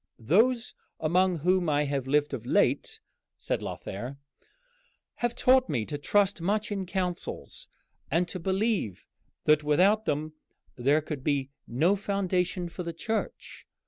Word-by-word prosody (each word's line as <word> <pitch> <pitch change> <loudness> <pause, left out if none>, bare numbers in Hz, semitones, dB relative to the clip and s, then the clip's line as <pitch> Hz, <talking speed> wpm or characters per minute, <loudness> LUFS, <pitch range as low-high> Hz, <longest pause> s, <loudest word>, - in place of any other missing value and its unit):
"Those 225 - +2 0.3
among 180 +3 +2
whom 175 +2 +2
I 145 0 +2
have 140 -2 -2
lived 145 +1 +2
of 115 - -4
late," 120 - +1 0.4
said - - -2
Lothair, 120 +8 -6 1.0
"have 240 -1 -1
taught 260 0 +4
me 120 -7 0
to 145 - -4
trust 200 +5 +2
much 210 +5 0
in 195 -2 -2
councils, 180 -2 -4 0.4
and 170 +4 +2
to 185 - -5
believe 190 - -1 0.4
that 150 0 +4
without 190 +9 +3
them 155 -1 -1 0.4
there 140 +5 +3
could 150 -3 -6
be 140 -2 0 0.2
no 160 +12 +2
foundation 185 -3 -1
for 170 - -7
the 170 -1 -4
Church. 220 +7 -4
175 Hz, 140 wpm, -28 LUFS, 145-195 Hz, 1.0 s, taught